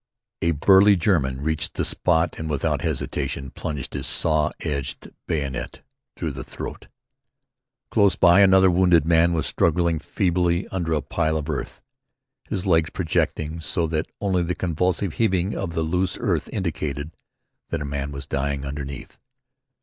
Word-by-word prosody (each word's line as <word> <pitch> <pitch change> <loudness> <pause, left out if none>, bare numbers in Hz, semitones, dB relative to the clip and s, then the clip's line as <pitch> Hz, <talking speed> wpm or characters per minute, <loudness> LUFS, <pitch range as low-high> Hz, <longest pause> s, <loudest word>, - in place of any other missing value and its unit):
A 85 - +2
burly 95 +6 +6
German 75 -8 +1
reached 80 +1 -1
the - - 0
spot 80 -1 +1
and 80 0 -4
without 75 0 0
hesitation 70 -3 -3
plunged 75 -5 -5
his - - -2
saw 80 -2 +2
edged 70 -3 -4 0.2
bayonet 70 -5 -3 0.3
through - - -2
the - - -7
throat. - - -8 1.0
Close 100 -3 +4
by 85 +3 +6
another 95 -1 +6
wounded 90 -3 +4
man 85 +1 +4
was 80 -4 0
struggling 85 +2 +1
feebly 90 +1 0
under 85 -4 -2
a 75 - 0
pile 80 -2 0
of 75 -1 -4
earth, 70 - -5 0.7
his 95 - -3
legs 80 -3 +3
projecting 80 -2 -1
so 80 +3 -1
that 80 0 -2
only 95 -3 +1
the 90 +1 -1
convulsive 90 +1 -1
heaving 95 -2 +1
of 95 -4 -3
the 80 - 0
loose 90 +3 0
earth - - -1
indicated 75 -5 -3 0.6
that - - -2
a - - -5
man 70 0 -3
was 70 0 -6
dying 70 +1 -2
underneath. 70 -1 -7
80 Hz, 150 wpm, -23 LUFS, 75-90 Hz, 1.0 s, burly